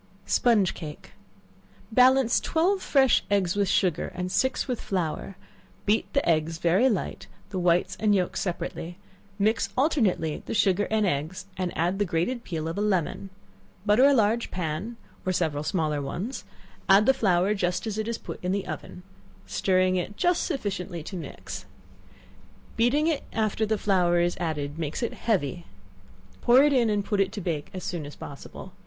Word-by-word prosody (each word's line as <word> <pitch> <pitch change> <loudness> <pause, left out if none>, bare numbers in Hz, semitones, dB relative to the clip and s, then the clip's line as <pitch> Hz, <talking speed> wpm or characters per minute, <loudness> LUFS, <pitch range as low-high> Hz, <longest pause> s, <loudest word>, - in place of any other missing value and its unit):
Sponge 220 -7 +3
Cake. 150 -3 -9 0.8
Balance 255 +1 +5
twelve 375 +4 +1
fresh 265 -3 +3
eggs 195 -3 +1
with 200 -1 +1
sugar, 180 -5 +1
and 180 0 -3
six 260 +7 +1
with 250 -3 -2
flour; 185 0 -3 0.5
beat 210 +2 +1
the 280 - +1
eggs 160 0 +1
very 180 +10 +3
light, 205 -7 -3 0.2
the 190 - -2
whites 175 0 +2
and 210 -2 +3
yelks 180 -2 0
separately; 175 -1 -4 0.4
mix 215 +2 +1
alternately 220 - +1
the - - -3
sugar 200 -1 +2
and 215 -1 +2
eggs, 180 +3 -2
and 185 -2 -2
add 175 +4 0
the 205 - +2
grated 185 +9 -1
peel 160 -3 -4
of 165 +4 -3
a - - 0
lemon; 195 -1 -1 0.6
butter 215 +5 +5
a 285 - +7
large 225 0 +2
pan, 180 +7 -4 0.3
or 185 - 0
several 160 -5 0
small 155 -4 0
ones; 180 - -5 0.4
add 195 +2 +7
the 265 - +5
flour 190 -4 +2
just 180 -1 -1
as 215 -1 -3
it 215 - -2
is 230 0 -2
put - - -9
in 180 - 0
the 200 0 -1
oven, 180 - -7 0.4
stirring 185 -1 +2
it 190 +3 -4
just 355 0 +2
sufficiently 195 - -3
to 190 - -7
mix. 170 - -7 1.1
Beating 245 +7 +2
it 320 -4 +1
after 220 0 0
the 220 0 +1
flour 180 -4 +2
is 175 0 +1
added 150 -3 -3
makes 160 - -3
it 235 - -1
heavy; 175 - -1 0.7
pour 250 +3 +6
it 295 -1 +4
in, 240 -4 +3
and 205 -1 0
put 205 -2 +1
it 195 - +1
to - - -4
bake 165 -6 -3
as 185 - -7
soon 165 -5 -4
as 145 - -10
possible. 140 - -10
195 Hz, 175 wpm, -26 LUFS, 175-225 Hz, 1.1 s, a